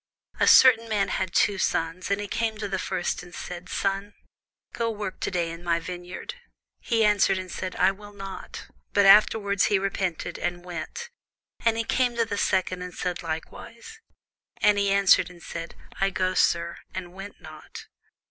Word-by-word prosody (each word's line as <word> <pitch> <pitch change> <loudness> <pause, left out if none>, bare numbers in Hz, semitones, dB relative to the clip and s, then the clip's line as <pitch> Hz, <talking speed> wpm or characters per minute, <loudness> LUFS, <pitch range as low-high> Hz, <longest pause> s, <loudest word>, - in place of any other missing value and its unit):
A - - +3
certain 230 -3 +7
man 200 -3 +1
had 185 -1 -2
two 200 +1 +2
sons; 165 +1 -1
and 200 0 +1
he 205 - -4
came 225 +1 -1
to 210 -1 -3
the 190 -1 -2
first, 185 -2 -2
and 175 0 -12
said, 180 0 -7
Son, 195 +1 -2 0.6
go 230 -1 -1
work 210 -3 -5
to - - -1
day 170 -3 -1
in 165 +1 -9
my 170 -1 +1
vineyard. 180 +1 -7 0.5
He 225 -2 +1
answered 205 -2 +3
and 185 -1 -6
said, 185 -1 -5
I - - +4
will 205 +1 -12
not: 195 -1 -8 0.3
but 200 -1 +4
afterward 200 0 +5
he 205 - +4
repented, 190 -3 -2
and 175 0 -3
went. 180 - -6 0.5
And 230 -1 +2
he 230 - 0
came 245 +1 +1
to 230 -1 +2
the 205 -2 -3
second, 185 -1 0
and 180 -1 -7
said 180 -1 -3
likewise. 205 - -7 0.6
And 205 -1 +3
he 200 0 +2
answered 195 -2 +5
and 175 -1 -15
said, 165 0 -7 0.2
I 195 - +3
go, 185 -1 0
sir: 170 -1 +1 0.2
and 180 -1 -6
went 195 +2 -10
not. - - -11
195 Hz, 180 wpm, -26 LUFS, 180-205 Hz, 0.6 s, certain